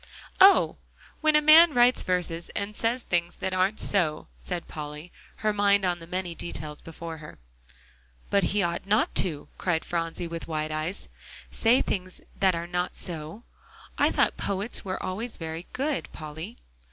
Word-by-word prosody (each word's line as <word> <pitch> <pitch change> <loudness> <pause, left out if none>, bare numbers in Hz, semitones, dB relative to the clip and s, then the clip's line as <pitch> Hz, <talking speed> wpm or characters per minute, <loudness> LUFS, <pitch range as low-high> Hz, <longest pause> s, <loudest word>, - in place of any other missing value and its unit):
"Oh! 390 +1 +6 0.4
when 310 -1 +3
a 300 - +5
man 315 0 +8
writes 245 +1 +5
verses 175 -2 -1
and 205 +1 -3
says 235 +3 0
things 175 -1 -1
that 190 - -3
aren't 185 +3 +1
so," 165 - +2
said 170 - -5
Polly, 150 +2 -7 0.3
her 215 - +3
mind 200 -1 +3
on 175 -1 0
the 165 - -11
many 180 0 -3
details 155 -3 -6
before 165 0 -8
her. 150 0 -11 0.9
"But 200 -3 +3
he 205 +2 +1
ought 170 +2 -2
not 210 +2 +2
to," 155 -6 -4
cried 170 -3 0
Phronsie, 165 0 -2
with 165 0 -6
wide 155 -1 -2
eyes, 155 +5 -3 0.4
"say 235 +3 +3
things 185 -1 -4 0.2
that 190 -2 +4
are 170 0 -3
not 180 +1 -2
so. 165 +5 -6 0.5
I - - +3
thought - - +1
poets 200 +3 -2
were 185 -1 -4
always 220 +6 -3
very 160 +1 -6
good, 280 +1 -2
Polly." 160 +8 -8
180 Hz, 165 wpm, -27 LUFS, 165-205 Hz, 0.9 s, man